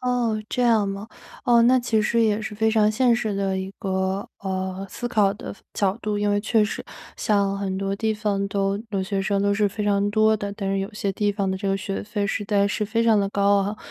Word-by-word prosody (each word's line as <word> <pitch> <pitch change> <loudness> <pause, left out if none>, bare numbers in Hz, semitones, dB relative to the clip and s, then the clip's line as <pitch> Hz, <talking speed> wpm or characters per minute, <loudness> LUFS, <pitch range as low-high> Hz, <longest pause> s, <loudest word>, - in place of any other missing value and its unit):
哦， 245 -4 0
这 250 - -1
样 220 -4 +3
吗？ 200 +2 -5 0.4
哦， 235 -1 +5
那 255 +2 +5
其 235 -3 +1
实 230 +2 +1
也 215 -1 +2
是 215 -1 -5
非 220 +1 +2
常 215 -1 +3
现 240 +1 +3
实 220 -3 -1
的 195 -1 -1
一 190 +1 -4
个， 190 0 -1
呃， 190 0 -3
思 240 - -5
考 205 -4 +3
的 215 - -8 0.2
角 195 0 0
度， 210 -1 -2
因 205 0 +1
为 205 0 +2
确 220 0 +2
实 210 - -4 0.3
像 200 -2 +1
很 190 -1 -2
多 195 0 -1
地 220 +1 0
方 205 -2 -1
都 195 0 0
留 195 -2 -1
学 195 0 -2
生 200 +1 0
都 200 0 +2
是 205 0 +2
非 205 +1 -4
常 205 0 +2
多 215 +1 +3
的， 200 -1 -4
但 195 -1 -3
是 195 - 0
有 195 +3 -4
些 200 -2 -2
地 205 +1 0
方 195 -2 -1
的 190 - -1
这 195 0 -3
个 195 - +1
学 195 0 -4
费 205 -1 -2
实 205 +1 -2
在 200 -1 +2
是 210 +1 -1
非 225 +2 0
常 225 -2 +5
的 195 - 0
高 200 0 +3
昂。 205 +2 -3
205 Hz, 265 characters per minute, -24 LUFS, 195-220 Hz, 0.4 s, 哦